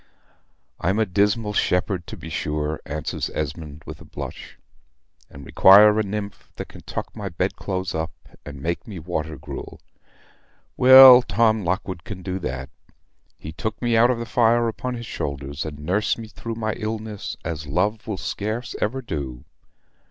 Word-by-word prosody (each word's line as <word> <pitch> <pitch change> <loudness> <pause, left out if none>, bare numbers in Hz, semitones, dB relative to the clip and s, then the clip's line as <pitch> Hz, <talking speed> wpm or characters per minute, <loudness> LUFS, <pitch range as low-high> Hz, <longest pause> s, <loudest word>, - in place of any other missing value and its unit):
"I'm 95 +5 0
a 110 - +3
dismal 105 +2 +1
shepherd, 90 -2 0
to - - -8
be 80 - -9
sure," 75 0 -2
answers 75 +1 -3
Esmond, 75 0 -5
with - - -9
a - - -10
blush; - - -8 0.7
"and 70 0 -12
require 105 +6 +7
a - - +4
nymph 100 -1 -5
that - - -7
can - - -12
tuck - - -6
my 105 -3 -5
bed 90 +2 -2
clothes 95 -2 -3
up, 80 0 -2 0.3
and 70 -2 -9
make 85 +8 -3
me 100 -4 -7
water 80 -2 -4
gruel. 70 0 -8 1.0
Well, 130 0 +10
Tom 110 0 +2
Lockwood 90 0 -2
can 95 -2 -8
do 95 0 -3
that. 70 -3 -5 0.7
He 80 - -8
took 110 +8 -4
me 120 -1 +1
out 115 +2 +5
of 125 - +1
the 115 - -4
fire 120 0 +3
upon 115 +4 -3
his 120 0 -6
shoulders, 70 -4 -4
and 75 -2 -6
nursed 90 +8 0
me 115 -2 -8
through 115 +1 -6
my 110 -1 -2
illness 110 -2 -5
as 80 -2 -4
love 105 +10 -1
will 105 -3 -3
scarce 110 +6 -4
ever 130 +5 -1
do. 70 - -5
95 Hz, 165 wpm, -23 LUFS, 80-110 Hz, 1.0 s, Well